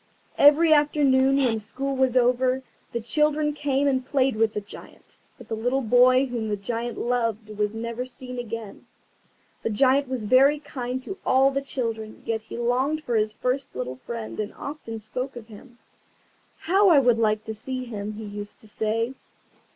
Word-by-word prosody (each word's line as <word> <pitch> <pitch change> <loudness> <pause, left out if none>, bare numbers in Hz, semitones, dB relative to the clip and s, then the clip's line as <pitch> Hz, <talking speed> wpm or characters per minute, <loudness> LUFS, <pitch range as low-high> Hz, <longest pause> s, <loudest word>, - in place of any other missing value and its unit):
Every 310 +3 +7
afternoon, 275 -3 +3
when 245 -5 +2
school 270 +6 -3
was 260 -1 +2
over, 255 +1 +2 0.3
the 235 - -2
children 300 +5 +1
came 285 -1 0
and 260 -2 +1
played 265 -1 +1
with 220 0 +1
the - - 0
Giant. 205 0 -14 0.2
But 245 - -13
the - - -4
little 245 +4 0
boy 250 +3 +5
whom 235 -4 -3
the 205 - -1
Giant 230 +4 -4
loved 230 -3 -1
was 210 +1 -1
never 235 +2 -4
seen 250 0 -7
again. 230 -3 -7 0.7
The - - -1
Giant 265 +5 +3
was 255 -4 -3
very 265 +7 +5
kind 260 -3 -5
to 390 +6 -7
all 265 +1 +4
the 275 0 -1
children, 225 -5 -4
yet 225 -1 -1
he 220 - -9
longed 260 +6 0
for 245 - -3
his 215 -1 +1
first 255 +2 -2
little 125 0 -4
friend, 225 - -7
and 210 0 -4
often 280 -6 -7
spoke 250 +5 -5
of 235 -2 -10
him. 240 +3 -14 0.8
"How 390 +4 +4
I 325 - +6
would 245 -4 +4
like 215 -1 +1
to 220 - -5
see 255 +4 -5
him!" 215 -3 -5
he 215 +1 -7
used 205 0 -8
to 220 - -13
say. 225 +3 -1
245 Hz, 180 wpm, -25 LUFS, 220-270 Hz, 0.8 s, Every